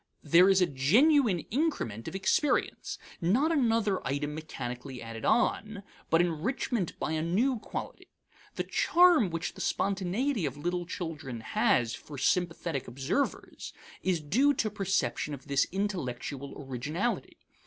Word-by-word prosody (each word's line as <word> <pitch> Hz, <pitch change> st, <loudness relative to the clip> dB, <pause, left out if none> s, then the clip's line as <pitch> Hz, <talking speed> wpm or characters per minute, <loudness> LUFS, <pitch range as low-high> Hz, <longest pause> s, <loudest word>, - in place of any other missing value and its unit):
There 170 Hz, +5 st, +6 dB
is 190 Hz, -1 st, +4 dB
a -, -, +5 dB
genuine 200 Hz, -, +3 dB
increment 230 Hz, -, -1 dB
of 160 Hz, -, -5 dB
experience; 265 Hz, +9 st, 0 dB, 0.2 s
not 240 Hz, -, +2 dB
another 225 Hz, -, +2 dB
item 145 Hz, +2 st, -2 dB
mechanically 130 Hz, -4 st, -6 dB
added 115 Hz, -1 st, -7 dB
on, 215 Hz, -3 st, +1 dB, 0.3 s
but 165 Hz, +1 st, +5 dB
enrichment 180 Hz, -, -1 dB
by -, -, -2 dB
a 160 Hz, -1 st, 0 dB
new 220 Hz, +10 st, +1 dB
quality. -, -, -7 dB, 0.5 s
The -, -, -1 dB
charm 345 Hz, -, +4 dB
which 165 Hz, 0 st, -3 dB
the -, -, -9 dB
spontaneity 200 Hz, -, 0 dB
of 135 Hz, +1 st, -6 dB
little 175 Hz, +3 st, -2 dB
children 150 Hz, -10 st, -5 dB
has 115 Hz, +1 st, +1 dB
for 145 Hz, -, -9 dB
sympathetic 165 Hz, -3 st, 0 dB
observers 135 Hz, -, -3 dB, 0.3 s
is 185 Hz, -3 st, +1 dB
due 260 Hz, -, +3 dB
to 215 Hz, -3 st, 0 dB
perception 190 Hz, -, -1 dB
of 135 Hz, -, -15 dB
this 140 Hz, -1 st, +2 dB
intellectual 140 Hz, -8 st, -3 dB
originality. 145 Hz, -, -3 dB
175 Hz, 130 wpm, -29 LUFS, 140-215 Hz, 0.5 s, There